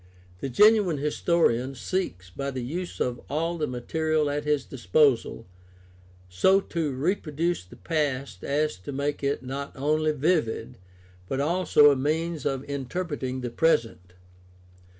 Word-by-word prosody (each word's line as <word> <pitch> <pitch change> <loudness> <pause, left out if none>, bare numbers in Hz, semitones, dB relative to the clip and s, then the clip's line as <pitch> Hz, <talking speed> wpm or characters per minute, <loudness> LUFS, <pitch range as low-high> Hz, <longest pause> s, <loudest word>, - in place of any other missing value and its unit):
The 135 - -3
genuine 205 - +5
historian 140 -3 +1
seeks, 105 - -3
by 140 +8 -4
the 130 -2 -4
use 175 +8 -5
of 120 -1 -1
all 165 +4 -1
the 150 - 0
material 155 +4 0
at 145 +1 -3
his 150 -3 +1
disposal, 120 0 +1 0.8
so 140 - +4
to 165 -6 -2
reproduce 165 - -1
the 90 - -15
past 145 -5 -2
as 150 -5 0
to 90 +9 -8
make 140 +1 -2
it 140 -1 0
not 140 +2 -5
only 155 +3 +1
vivid, 130 -6 0 0.5
but 135 - -2
also 150 -1 +5
a - - +2
means 155 +3 -1
of 135 -1 -3
inter 140 +6 -3
preting 130 -5 -4
the 120 -1 -4
present. 115 - +1
145 Hz, 140 wpm, -26 LUFS, 130-160 Hz, 0.8 s, genuine